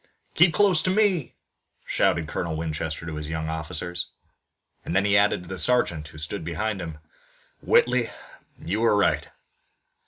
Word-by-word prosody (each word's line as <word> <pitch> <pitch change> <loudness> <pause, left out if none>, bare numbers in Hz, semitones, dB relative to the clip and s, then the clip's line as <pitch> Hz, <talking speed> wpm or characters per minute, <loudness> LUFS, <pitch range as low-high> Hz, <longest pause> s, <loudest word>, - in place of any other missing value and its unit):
"Keep 170 -1 +5
close 190 -6 +4
to 185 - 0
me!" 190 - +1 0.5
shouted 80 -2 +1
Colonel 80 0 -3
Winchester 80 0 -3
to 80 -2 -5
his 75 0 -5
young 80 0 -3
officers, 80 +2 -4 0.8
and - - -4
then 95 +1 +3
he 100 0 +3
added 100 -3 +3
to 90 - -13
the 95 -1 -5
sergeant, 85 -11 +1
who 80 - -13
stood 80 +2 -5
beside 95 +5 -2
him: 80 -3 -6 0.6
"Whitley, 475 +1 +3 0.5
you - - -2
were - - +3
right!" - - +2
85 Hz, 155 wpm, -25 LUFS, 80-125 Hz, 0.8 s, Keep